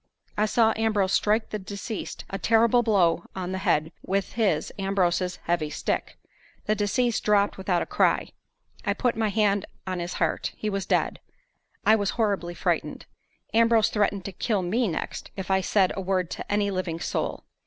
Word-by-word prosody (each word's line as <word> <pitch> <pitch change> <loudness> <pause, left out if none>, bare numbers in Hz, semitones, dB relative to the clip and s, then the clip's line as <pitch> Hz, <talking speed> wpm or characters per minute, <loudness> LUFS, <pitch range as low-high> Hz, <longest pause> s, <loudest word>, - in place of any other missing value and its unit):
I 215 +1 +2
saw 225 0 +3
Ambrose 210 -4 +1
strike 215 +2 +2
the 215 - -2
deceased 200 +3 -6
a 195 - -3
terrible 230 +1 +4
blow 185 -7 +2
on 185 -1 -3
the 190 - -2
head 155 -3 +1
with 195 0 -1
his 195 -9 0
(Ambrose's) 185 -2 +1
heavy 165 -3 0
stick. - - -3 0.5
The 215 - +2
deceased 220 +3 0
dropped 205 -1 +3
without 185 -2 0
a - - -6
cry. - - +2 0.5
I - - 0
put 245 -3 +1
my 220 -1 +1
hand 205 -1 +1 0.2
on 185 -1 -3
his 175 0 -4
heart. 165 -2 -1
He 215 - -2
was 195 -1 -3
dead. - - +1 0.7
I 215 - +7
was 205 -2 0
horribly 200 -6 0
frightened. - - -1 0.5
Ambrose 230 -1 +4
threatened 205 -2 0
to 200 - -4
kill 195 +1 -1
me 225 +7 +1
next 165 - -4
if 190 0 -4
I 190 0 +3
said 190 0 +2
a 195 - -3
word 185 -2 -1
to - - -6
any 205 -1 +1
living 185 -3 -2
soul. - - -2
200 Hz, 175 wpm, -26 LUFS, 185-215 Hz, 0.7 s, I